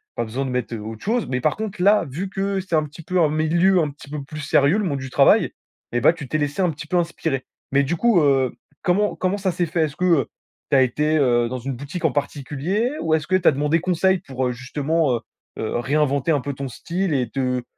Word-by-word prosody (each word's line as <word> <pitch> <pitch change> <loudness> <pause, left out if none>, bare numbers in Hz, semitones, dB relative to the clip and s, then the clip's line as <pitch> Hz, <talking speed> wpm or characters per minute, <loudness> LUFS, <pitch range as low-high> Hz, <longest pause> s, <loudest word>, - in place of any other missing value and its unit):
pas - - -1
besoin 125 +5 -3
de - - -3
mettre 125 -2 -2
autre 110 +1 -8
chose, 230 +2 0
mais 125 -1 -1
par 155 - +1
contre 210 -4 -5
là, 205 -2 +4
vu 180 +8 -4
que 195 0 -1
c'est 185 -3 -2
un 155 - +3
petit 150 +3 -10
peu 180 +3 -1
un 155 - +4
milieu 170 +5 +3
un 155 -3 +1
petit 140 0 -13
peu 150 -1 -4
plus 155 +2 -8
sérieux, 150 +5 +3
le 210 - 0
monde 140 -7 -1
du 130 0 -6
travail - - +4 0.4
et 120 - +2
bah, 150 - +6
tu 150 -5 -8
t'es 155 - -1
laissé 145 +5 -1
un 180 - +3
petit 155 0 -6
peu 180 - +1
inspirer. 160 -5 -1 0.3
Mais 140 +1 +4
du 160 +6 -1
coup, 230 -1 +3
heu, 135 -3 +3 0.3
comment 205 +4 +2
comment 185 +2 -1
ça 190 -2 0
s'est 175 - 0
fait? 165 0 0
Est-ce 150 0 -7
que, 180 - -1
heu, 165 -8 +3 0.4
tu - - +3
as - - +6
été, 150 +5 +1
heu, 120 -4 +3
dans 130 - -3
une 135 +2 -4
boutique 145 +7 -7
en 150 - +3
particulier 145 - -1
ou 160 -1 0
est-ce 155 -1 -2
que 185 - +2
tu 185 - +2
as - - +8
demandé 150 +4 +1
conseil 185 +2 +2
pour, 130 -7 -4
heu, - - 0
justement, 140 +3 0
heu - - -2 0.4
heu, 110 +1 -2
réinventer 140 +2 +1
un 145 -4 +2
peu 140 +1 -4
ton 135 0 -5
style 175 +7 -3
et 125 -3 0
te 125 -2 -1
150 Hz, 255 wpm, -22 LUFS, 135-180 Hz, 0.4 s, as